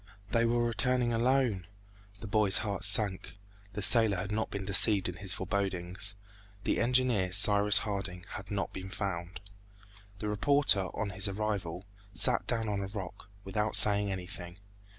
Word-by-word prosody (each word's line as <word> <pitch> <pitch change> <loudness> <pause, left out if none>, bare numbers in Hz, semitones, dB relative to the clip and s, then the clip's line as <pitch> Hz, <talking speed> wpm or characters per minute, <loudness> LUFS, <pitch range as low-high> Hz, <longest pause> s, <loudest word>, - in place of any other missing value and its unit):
They 115 0 +1
were 120 +1 0
returning 120 +2 -1
alone!... 120 -6 0 0.5
The - - -8
boy's 105 -1 +1
heart 100 -2 -2
sank; 100 0 +4 0.4
the 105 0 -5
sailor 110 -3 +5
had 95 +3 -5
not 110 +1 -2
been 100 -1 -6
deceived 100 0 +5
in 90 -1 -7
his 100 -2 -2
forebodings; 95 0 -3 0.5
the - - -1
engineer, 120 -6 +1
Cyrus 105 +1 +5
Harding, 95 -4 -5
had 100 -1 -9
not 100 -3 -4
been 95 0 -8
found! 95 -3 -5 0.8
The 105 - -6
reporter, 105 -2 +1
on 105 -2 -3
his 100 0 0
arrival, 100 -3 -4 0.3
sat 125 +3 +1
down 115 -2 -2
on 100 -1 -3
a 100 - -5
rock, 95 -2 -9
without 105 +2 -3
saying 100 -1 +5
anything. 90 -1 -8
100 Hz, 150 wpm, -29 LUFS, 95-110 Hz, 0.8 s, sailor